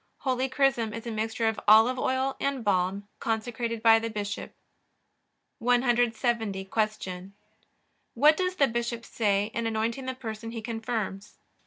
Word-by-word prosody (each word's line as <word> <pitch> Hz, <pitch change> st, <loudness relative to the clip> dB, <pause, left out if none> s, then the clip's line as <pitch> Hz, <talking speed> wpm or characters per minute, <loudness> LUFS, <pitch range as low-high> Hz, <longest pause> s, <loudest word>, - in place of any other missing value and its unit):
Holy 260 Hz, 0 st, 0 dB
chrism 250 Hz, -5 st, +1 dB
is 230 Hz, -, -7 dB
a 235 Hz, -, -4 dB
mixture 225 Hz, +1 st, -1 dB
of 220 Hz, -1 st, 0 dB
olive 225 Hz, +4 st, +6 dB
oil 260 Hz, +1 st, 0 dB
and 275 Hz, -3 st, -1 dB
balm, 195 Hz, 0 st, 0 dB
consecrated 230 Hz, 0 st, -2 dB
by 225 Hz, -1 st, +7 dB
the 230 Hz, 0 st, -3 dB
bishop. 205 Hz, -1 st, -5 dB, 1.0 s
170. 235 Hz, -4 st, +1 dB
Q. 195 Hz, -3 st, -3 dB, 0.8 s
What 305 Hz, +2 st, +6 dB
does 365 Hz, +1 st, -1 dB
the 280 Hz, -6 st, +4 dB
bishop 235 Hz, -1 st, -3 dB
say 205 Hz, -1 st, 0 dB
in 230 Hz, 0 st, -1 dB
anointing 225 Hz, +4 st, -2 dB
the 260 Hz, -, -3 dB
person 225 Hz, -2 st, -6 dB
he 230 Hz, -1 st, -6 dB
confirms? 225 Hz, -3 st, -4 dB
230 Hz, 140 wpm, -27 LUFS, 215-245 Hz, 1.0 s, by